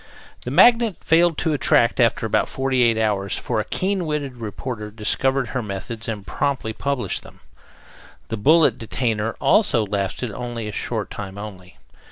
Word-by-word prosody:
The - - -3
Magnet 235 -4 +5
failed 165 0 +3
to 160 -2 0
attract 120 -3 +3
after 115 -2 +2
about 110 - +1
forty 135 -1 0
eight 115 -2 +4
hours, 100 -3 0
for - - -2
a - - 0
keen 190 -2 -1
witted 145 -4 -3
reporter 110 0 -5
discovered 125 +4 0
her 125 - -2
methods 110 +2 -6
and 105 -3 -4
promptly 125 +1 -2
published 140 +1 -2
them. - - -16 0.9
The 115 - -3
bullet 155 +9 +4
detainer 115 -1 -2
also 120 - +3
lasted 100 +3 -3
only 120 0 -5
a - - -4
short - - -3
time 100 -1 -7
only. 90 -7 -9
115 Hz, 160 wpm, -22 LUFS, 105-140 Hz, 0.9 s, Magnet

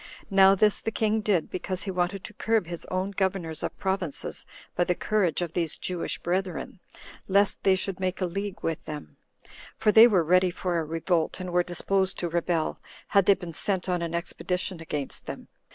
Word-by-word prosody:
Now 195 0 +7
this 210 +1 +3
the - - -1
king 220 0 0
did, 195 -6 +1
because 185 0 -3
he 195 - -3
wanted 185 +2 -1
to - - -8
curb 225 -1 +1
his 170 0 -6
own 185 +2 -2
governors 185 -5 -1
of - - -4
provinces 190 -6 -3 0.3
by 175 - +3
the 180 - +1
courage 185 -5 +1
of 170 -2 -5
these 165 -3 -1
Jewish 180 -2 -3
brethren, 185 +1 -3 0.5
lest 200 +1 +3
they 190 -1 +4
should 190 0 -3
make 185 0 -1
a 185 - +1
league 195 +3 -4
with 165 -1 -2
them; 150 - -8 0.6
for 210 - +3
they 225 +2 +9
were 190 -7 +3
ready 180 +3 +4
for 175 -1 -1
a - - -1
revolt, 165 +2 0
and 185 -1 -5
were 180 - +4
disposed 190 +2 0
to 175 - -2
rebel, 170 -1 -1 0.3
had 200 -3 +4
they 200 - +7
been 175 -3 -8
sent 190 +2 -1
on 180 -1 0
an 170 0 -2
expedition 180 +1 -3
against 150 -4 -4
them. - - -7
185 Hz, 195 wpm, -27 LUFS, 170-195 Hz, 0.6 s, they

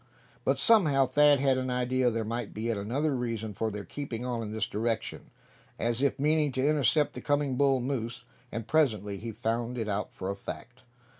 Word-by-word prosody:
But - - +2
somehow 155 -12 +5
Thad 145 +2 +5
had 135 -1 +3
an 130 0 -2
idea 125 0 +1
there 115 -1 -2
might 115 0 -4
be 110 - -4
yet 115 -1 0
another 135 +9 -1
reason 115 -3 -3
for 110 +2 -1
their 105 -1 -6
keeping 125 -5 -5
on 120 -2 -2
in 110 - -4
this 110 0 -1
direction, 110 +1 -3 0.5
as 120 +2 -1
if 140 - +2
meaning 150 0 +2
to 130 +2 +1
intercept 150 0 +3
the - - -7
coming 145 -2 +1
bull 135 0 +3
moose; 120 -2 -3 0.3
and 115 0 -4
presently 105 -10 +1
he 115 +2 -5
found 115 +3 -2
it 110 -2 -2
out 105 0 -2
for 95 +1 -4
a - - -4
fact. 120 +5 -8
125 Hz, 200 wpm, -29 LUFS, 110-140 Hz, 0.5 s, somehow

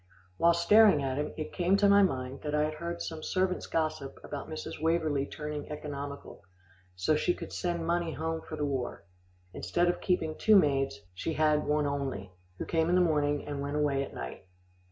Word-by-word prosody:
While 170 0 +5
staring 195 -2 +6
at 135 +1 -1
him, 150 - -2
it 155 - -5
came 180 +2 +2
to 200 0 +4
my 200 0 +7
mind 130 -7 -1
that 150 0 -2
I 150 - +3
had 155 0 -1
heard 170 +2 -4
some 160 -1 -5
servants' 185 +2 -1
gossip 155 -4 -2
about 145 - -6
Mrs. 155 -1 -6
Waverlee 160 -4 +1
turning 150 -1 -5
economical, 145 -1 -6 0.5
so 90 +12 +2
she 175 +3 +1
could - - -8
send 170 -2 -2
money 170 0 0
home 160 0 -3
for 155 - -7
the 150 -1 -1
war. 130 -10 -3 0.5
Instead 175 - +1
of 175 - -1
keeping 160 -4 0
two 215 +5 +4
maids, 135 - +3
she 125 - -3
had 155 -1 +2
one 150 0 +2
only, 135 -9 -3 0.3
who - - -4
came 165 0 +1
in 180 - +3
the - - +5
morning, 150 -4 +1
and 145 -1 -4
went 140 +1 -3
away 145 -2 +1
at - - -8
night. 60 +8 -7
150 Hz, 195 wpm, -30 LUFS, 140-170 Hz, 0.5 s, my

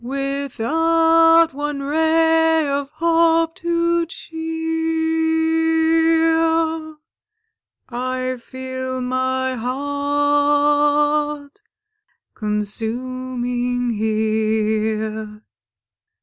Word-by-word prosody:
Without 325 +5 +2
one 290 0 -4
ray 320 +1 +2
of 280 0 -2
hope 330 +1 +2
to 340 -1 0
cheer, 325 0 0 0.9
I 255 +1 -3
feel 260 0 -6
my 260 +1 -1
heart 290 - 0 0.7
consuming 245 +3 -2
here. 215 0 -1
290 Hz, 50 wpm, -20 LUFS, 255-325 Hz, 0.9 s, Without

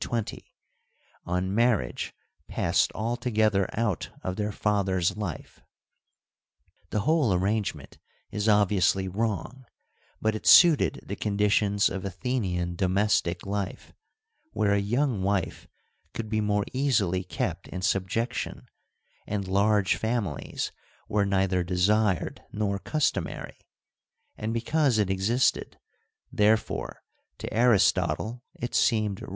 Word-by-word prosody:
320), 115 -3 -5 0.7
on 90 +2 -1
marriage 115 0 +1 0.4
passed - - +1
altogether 110 -3 +1
out 105 -8 -1
of 95 - -3
their 105 +1 -2
father's 95 -3 0
life. 100 -7 -6 1.3
The 105 - -1
whole 150 -2 +2
arrangement 95 -5 -2 0.3
is 105 +1 0
obviously 100 -2 +3
wrong, 110 +5 -3 0.6
but 110 0 +1
it 110 - -5
suited 170 -5 +6
the - - -4
conditions 100 0 +2
of 95 -1 -4
Athenian 95 -4 -2
domestic 95 -1 +1
life, 100 -1 -4 0.6
where 100 -1 +2
a 100 - +2
young 120 +2 0
wife 95 -2 -1 0.5
could 110 -2 -4
be 110 0 0
more 105 -1 +1
easily 105 -10 +1
kept 90 - -4
in 90 0 -6
subjection 100 +7 -1 0.6
and 100 -2 -3
large 100 0 +2
families 110 - -2 0.4
were 100 -1 +1
neither 95 -2 +1
desired 95 +1 +1
nor 100 -2 -1
customary; 155 +7 -2 0.7
and 110 +1 -3
because 125 +2 +1
it 100 -3 +1
existed, 105 +7 +1 0.5
therefore 110 +1 0 0.3
to - - -6
Aristotle 110 -1 +2
it 120 - -5
seemed 105 -4 +1
right. - - -8
105 Hz, 110 wpm, -27 LUFS, 95-110 Hz, 1.3 s, suited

